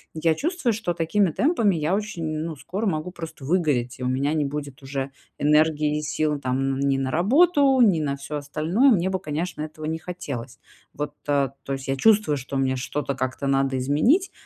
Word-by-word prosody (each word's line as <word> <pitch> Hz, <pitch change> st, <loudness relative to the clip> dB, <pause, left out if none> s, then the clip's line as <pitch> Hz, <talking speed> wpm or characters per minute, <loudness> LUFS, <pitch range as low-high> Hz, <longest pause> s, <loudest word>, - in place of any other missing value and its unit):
Я 160 Hz, 0 st, +2 dB
чувствую, 325 Hz, -, 0 dB
что 205 Hz, -5 st, -2 dB
такими 175 Hz, +3 st, +2 dB
темпами 230 Hz, -, +2 dB
я 155 Hz, +3 st, 0 dB
очень, 205 Hz, -6 st, -3 dB
ну, 160 Hz, 0 st, -4 dB
скоро 200 Hz, +9 st, -4 dB
могу 165 Hz, 0 st, -2 dB
просто 165 Hz, -6 st, -8 dB
выгореть, 140 Hz, -8 st, 0 dB
и -, -, -5 dB
у -, -, 0 dB
меня 140 Hz, +4 st, 0 dB
не 150 Hz, -2 st, +1 dB
будет 140 Hz, -2 st, -5 dB
уже 135 Hz, 0 st, -4 dB, 0.3 s
энергии 150 Hz, 0 st, +3 dB
и -, -, -4 dB
сил, 150 Hz, -1 st, -1 dB
там, 130 Hz, -1 st, -1 dB, 0.2 s
н -, -, -4 dB
ни 140 Hz, -1 st, +2 dB
на 130 Hz, -1 st, -1 dB
работу, 275 Hz, -, +4 dB
ни 190 Hz, -8 st, +5 dB
на 140 Hz, -2 st, -1 dB
всё 150 Hz, +2 st, -5 dB
остальное. 160 Hz, -, +2 dB
Мне 190 Hz, -2 st, +2 dB
бы, 190 Hz, -, -1 dB
конечно, 160 Hz, 0 st, -4 dB
этого 155 Hz, 0 st, -6 dB
не 160 Hz, +1 st, -2 dB
хотелось. 140 Hz, -9 st, -6 dB, 0.4 s
Вот, 145 Hz, 0 st, -4 dB
а, 140 Hz, -2 st, +2 dB
то 135 Hz, -, -3 dB
есть, 135 Hz, 0 st, -5 dB
я 135 Hz, -, 0 dB
чувствую, 205 Hz, -5 st, +4 dB
что 135 Hz, +1 st, -5 dB
мне 130 Hz, -1 st, +1 dB
что-то 140 Hz, +2 st, -3 dB
как-то 130 Hz, +1 st, -3 dB
надо 135 Hz, -1 st, +1 dB
изменить, 190 Hz, -, +2 dB
150 Hz, 200 wpm, -24 LUFS, 140-180 Hz, 0.4 s, ни